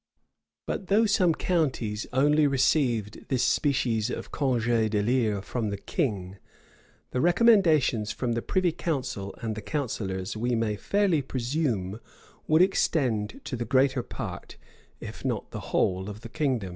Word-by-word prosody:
But 190 - -4
though 215 +3 +4
some 185 -6 +3
counties 130 - -1
only 145 +3 +4
received 130 -6 +1
this 130 -3 +1
species 125 -3 +1
of - - -5
congé 120 -5 +1
d'élire 105 -1 +1
from 115 0 -2
the 100 - -3
king; 100 - -3 0.7
the 125 - 0
recommendations 170 - +4
from 125 -2 -2
the 115 0 -1
privy 185 +3 +1
council 130 - -3
and 110 -1 -1
the 110 - -6
counsellors, 105 -8 -3
we 120 +3 0
may 115 -2 0
fairly 195 - +1
presume, 120 - -2 0.5
would 155 +3 +5
extend 125 - 0
to - - -4
the 120 - -3
greater 130 +2 +2
part, - - -7 0.4
if - - -9
not - - -3
the - - -5
whole, 95 +2 +1
of 105 +1 -8
the 115 - -9
kingdom. 130 - -1
125 Hz, 145 wpm, -27 LUFS, 110-155 Hz, 0.7 s, would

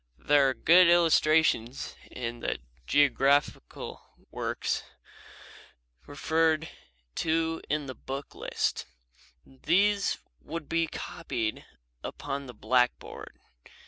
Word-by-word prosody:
There 145 -2 +4
are 130 - -2
good 180 +1 +6
illustrations 160 -7 +3
in 120 -1 -5
the - - -2 0.3
geographical 140 - +1 0.3
works - - -2 1.3
referred 160 +2 +1 0.5
to 165 0 0
in 150 -1 0
the 130 - -6
book 135 +2 -7
list. - - -2 0.6
These 195 +9 +1 0.3
could 160 -1 -6
be 165 0 +1
copied 150 -12 -4 0.4
upon 140 -1 -5
the 125 - -10
blackboard. 125 +3 -1
145 Hz, 90 wpm, -28 LUFS, 130-165 Hz, 1.3 s, good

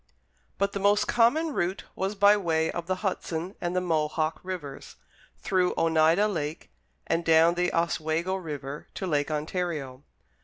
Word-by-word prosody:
But 200 0 +1
the 200 - -2
most 205 +1 +3
common 295 +7 +3
route 180 -2 -1
was 195 +2 -2
by 205 +1 +6
way 160 -5 0
of 170 -1 -5
the 185 - 0
Hudson 180 -1 -3
and 175 0 -2
the 180 - +2
Mohawk 155 -2 0
Rivers, 170 -7 -7 0.4
through 185 -2 0
Oneida 165 +5 +3
Lake 160 -5 -4 0.3
and 170 - 0
down 165 +1 +5
the 180 0 0
Oswego 165 +1 0
River 150 -6 -6
to 190 - -4
Lake 145 -4 0
Ontario. 150 -4 -3
170 Hz, 150 wpm, -27 LUFS, 155-190 Hz, 0.4 s, by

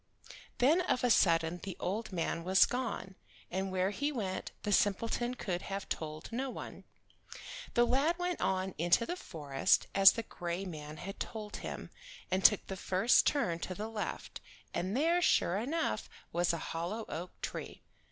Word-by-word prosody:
Then 290 +8 +4
of 255 -8 0
a 245 - +4
sudden 165 -3 +3
the 190 -2 -6
old 215 +4 -2
man 170 -1 -2
was 190 +2 +6
gone, 240 -6 -3 0.4
and 190 0 -2
where 185 +1 +1
he 285 +8 -1
went 195 -8 -3
the 205 - -1
simpleton 230 +5 +1
could 180 -6 -3
have 195 0 -5
told 155 +3 -5
no 260 +4 -2
one. - - -8 0.9
The 240 - +5
lad 280 +8 +2
went 355 -1 -2
on 190 0 0
into 175 +7 +4
the 350 - -3
forest, 150 - +1
as 195 0 +8
the 230 - -3
gray 175 -1 -4
man 155 -3 -7
had 195 +5 -7
told 215 -2 -5
him, - - -6 0.4
and 185 +1 +1
took 210 - +6
the 190 - -5
first 190 +6 +3
turn 180 - +1
to 185 - -4
the 215 +3 -4
left, 220 -2 -5 0.3
and 185 +6 -1
there 335 +5 +3
sure 185 - +3
enough 290 +10 -1 0.2
was 175 0 +2
a 170 - -1
hollow 180 +7 -3
oak 170 +4 -6
tree. - - -5
195 Hz, 170 wpm, -33 LUFS, 175-240 Hz, 0.9 s, as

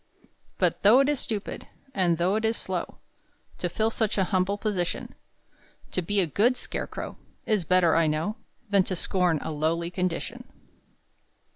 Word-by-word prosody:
But - - +1
though 225 +6 +7
it 275 - +2
is 295 -3 +1
stupid, 210 -3 -4 0.3
And 175 -6 +2
though 180 +4 +2
it 220 - -1
is 225 +1 +1
slow, - - -3 0.6
To 175 - -1
fill 220 +5 0
such 220 -2 -1
an 190 - +3
humble 190 +2 +1
position; 200 -5 -2 0.8
To 185 - 0
be 200 +4 0
a - - +2
good 225 - +2
scarecrow - - -5 0.3
Is 210 -6 +1
better 180 -1 +4
I 165 -1 +4
know 160 +9 -1 0.3
Than 200 -1 +6
to 185 - -2
scorn 180 -1 +1
a 160 - -3
lowly 165 +3 -1
condition. 185 +7 -3
185 Hz, 160 wpm, -27 LUFS, 170-215 Hz, 0.8 s, though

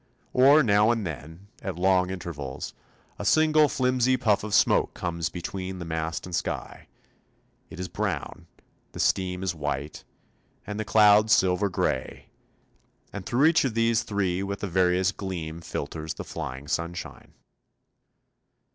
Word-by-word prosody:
Or 140 +4 +6
now 105 -1 +4
and 115 -3 0
then, 80 +4 -8 0.2
at 95 -6 -4
long 90 0 +3
intervals, 80 -8 -6 0.5
a - - -4
single 155 +4 +4
flimsy 130 0 +2
puff 105 -5 +1
of 105 -1 -1
smoke - - +3
comes 85 -1 -3
between 95 +2 -5
mast 80 0 -3
and 90 - -9
sky; 80 - -4 0.8
it - - -10
is 90 - -3
brown, - - -4 0.5
the - - -8
steam 90 -1 0
is 95 -2 -1
white, 75 -1 -4 0.6
and 105 +1 -5
the 110 - -2
cloud 105 0 +5
silver 95 0 +3
grey; 65 -7 -2 0.8
and 100 -2 -6
through 130 +5 +3
each 160 0 +4
of 125 -5 -2
these 115 0 +2
three 95 -3 -1
with 100 +1 -4
a - - 0
various 90 +1 +2
gleam 85 -5 -6
filters 80 0 -5
the - - -6
flying 65 +3 -6
sunshine. 85 +1 -5
95 Hz, 140 wpm, -26 LUFS, 85-110 Hz, 0.8 s, Or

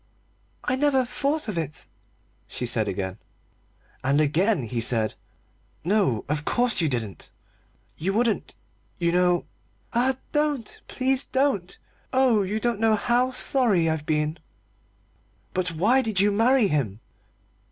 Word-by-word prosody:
"I 255 - +1
never 265 -2 +2
thought 280 +3 -1
of 200 -6 -2
it," 150 -2 -6 0.6
she 125 - -4
said 110 -2 +1
again. 95 0 -3 0.8
And 140 +3 +2
again 160 - +2
he 115 0 -3
said: 115 -2 0 0.7
"No, 180 - +1
of 150 0 -1
course 240 +3 +1
you 160 - +2
didn't; 110 -7 -4 0.7
you 185 +5 0
wouldn't, 225 +1 0 0.4
you 170 -2 +1
know 180 0 +2 0.2
" - - -35
"Ah, 250 +2 +2
don't! 295 -6 -1
please 265 +1 +1
don't! 260 -10 0 0.3
Oh, 255 -5 +3
you 200 +3 -1
don't 235 -1 0
know 225 -1 +4
how 240 +4 +2
sorry 245 -9 +2
I've 160 -2 -2
been 155 +1 0 0.5
" - - -38
"But 180 -1 0
why 220 +11 +3
did 220 -6 -2
you 205 +1 +4
marry 230 +2 +4
him?" 130 - -1
195 Hz, 140 wpm, -25 LUFS, 150-245 Hz, 0.8 s, know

